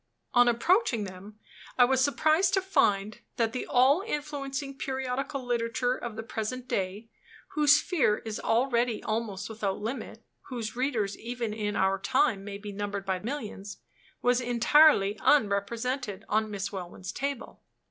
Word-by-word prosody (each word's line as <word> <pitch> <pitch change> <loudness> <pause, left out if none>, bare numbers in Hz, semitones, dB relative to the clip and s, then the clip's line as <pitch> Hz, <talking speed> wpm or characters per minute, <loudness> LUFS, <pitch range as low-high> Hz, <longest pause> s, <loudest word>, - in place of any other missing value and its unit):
On 245 0 +6
approaching 240 - +2
them, 195 +2 -10 0.4
I 250 - +7
was 260 +1 +2
surprised 315 +7 +3
to 385 - +2
find 210 - +1 0.2
that 230 -1 0
the 250 - -4
all 265 +7 +4
influencing 285 -6 -4
periodical 265 0 -3
literature 240 +1 0
of 240 -4 -6
the 225 - -5
present 245 +2 -4
day 200 +3 -3 0.4
whose 295 -1 +5
sphere 300 - +2
is 220 -1 -4
already 235 -1 +1
almost 215 -3 -3
without 210 -3 -3
limit; 225 +6 -5 0.2
whose 235 -4 -5
readers, 240 -6 -1
even 235 -1 -4
in 210 -1 -3
our 190 0 +2
time, 220 0 +1
may 200 0 -6
be 205 0 -8
numbered 200 0 -4
by 190 -1 -1
millions 210 -4 -6 0.5
was 245 +1 +3
entirely 240 -3 +4
unrepresented 225 -1 +1
on 215 +1 +1
Miss 200 -2 -4
Welwyn's 185 -1 -6
table. 280 -1 -5
235 Hz, 145 wpm, -28 LUFS, 205-265 Hz, 0.5 s, I